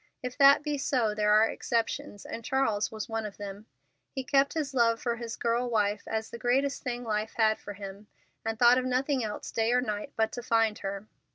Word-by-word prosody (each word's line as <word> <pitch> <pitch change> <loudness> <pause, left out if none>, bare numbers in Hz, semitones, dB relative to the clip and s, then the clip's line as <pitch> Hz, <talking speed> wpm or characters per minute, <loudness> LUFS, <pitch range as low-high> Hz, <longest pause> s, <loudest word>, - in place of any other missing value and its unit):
If 250 0 -4
that 280 +1 +7
be 295 -1 -2
so, 245 -6 +1
there 210 0 +1
are 215 +1 +6
exceptions, 230 -1 -2
and 230 - -6
Charles 225 -5 0
was 220 0 -5
one 225 -1 -2
of 210 -2 -7
them. 205 +1 -8 0.4
He 265 - -5
kept 275 +3 +2
his 295 -4 -2
love 230 -2 +3
for 235 -1 -2
his 230 -1 -5
girl 240 +1 0
wife 210 -2 0
as 220 0 -3
the 235 - -7
greatest 270 +4 +1
thing 245 -1 -4
life 215 -1 -2
had 220 -1 +3
for 205 - -8
him, 200 +1 -9 0.4
and 225 0 -2
thought 245 +2 +6
of 255 - -3
nothing 255 +1 0
else 210 -1 -5
day 225 0 +1
or 250 - +4
night 210 -4 -3
but 220 0 +1
to 245 - -5
find 225 -2 +1
her. 195 +1 -5
230 Hz, 215 wpm, -29 LUFS, 215-250 Hz, 0.4 s, that